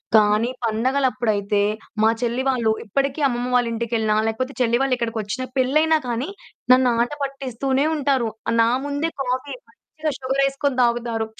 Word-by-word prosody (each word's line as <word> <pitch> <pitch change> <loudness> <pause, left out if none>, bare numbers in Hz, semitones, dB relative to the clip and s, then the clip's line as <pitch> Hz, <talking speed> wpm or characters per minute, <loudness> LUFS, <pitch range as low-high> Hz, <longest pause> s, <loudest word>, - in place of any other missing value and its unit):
కానీ 215 +2 +4 0.2
పండగలప్పుడైతే 225 -4 0 0.4
మా 220 - +6
చెల్లి 240 +2 -1
వాళ్ళు, 230 -4 +2
ఇప్పడికీ 275 +7 -1
అమ్మమ్మ 245 0 -2
వాళ్ళింటికెళ్ళినా, 230 -2 0
లేకపోతే 255 +5 -3
చెల్లి 240 0 +2
వాళ్ళిక్కడికొచ్చినా, 235 -2 -2
పెళ్లయినా 310 +5 +3
కానీ, 245 +8 -2 0.4
నన్ను 255 -1 +4
ఆటపట్టిస్తూనే 275 0 -1
ఉంటారు. 270 -5 +1 0.3
నా 230 - +4 0.2
ముందే 290 +3 -2
కాఫీ 255 +3 -2
మంచిగా 310 -8 -6
షుగరేసుకొని 275 +1 0
దాగుతారు. 235 -2 0
250 Hz, 115 wpm, -22 LUFS, 230-275 Hz, 0.4 s, మా